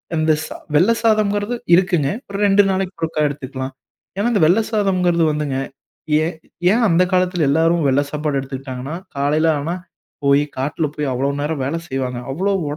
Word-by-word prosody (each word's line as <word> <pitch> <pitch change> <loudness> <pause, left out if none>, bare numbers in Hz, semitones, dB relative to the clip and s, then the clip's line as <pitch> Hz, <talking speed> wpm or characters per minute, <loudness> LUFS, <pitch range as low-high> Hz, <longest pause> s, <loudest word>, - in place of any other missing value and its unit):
அந்த 155 0 +2
ச - - -7 0.3
வெள்ளை 180 +10 +5
சாதம்ங்கிறது 215 0 +2 0.2
இருக்குங்க. 175 -6 +2 0.2
ஒரு 200 - -4
ரெண்டு 200 +1 +5
நாளைக்கு 190 0 -1
ஒருக்கா 160 -1 -1
எடுத்துக்கலாம். 135 -2 -5 0.4
ஏன்னா, 205 +4 +1
இந்த 205 - +2
வெள்ளை 185 +8 +4
சாதம்ங்கிறது 180 -5 +2
வந்துங்க. 150 -3 -2 0.7
ஏன் 165 0 -3 0.4
ஏன் 235 +2 +2
அந்த 170 +1 +4
காலத்தில 180 -3 +2
எல்லாரும் 165 +2 +2
வெள்ளை 135 +2 +3
சாப்பாடு 150 -2 -1
எடுத்துக்குட்டாங்கன்னா? 135 +1 -6 0.2
காலையில 150 +3 +2
ஆனா 165 +5 -3 0.5
போயி 140 +1 +4
காட்டில 145 +4 -1
போயி 150 - -2
அவ்வளோ 135 +3 0
நேரம் 150 -1 -2
வேலை 150 +5 -1
செய்வாங்க. 130 -2 -3
அவ்வளோ 190 +8 0 0.2
உடம்பும் 145 - -2
160 Hz, 160 wpm, -19 LUFS, 140-185 Hz, 0.7 s, வெள்ளை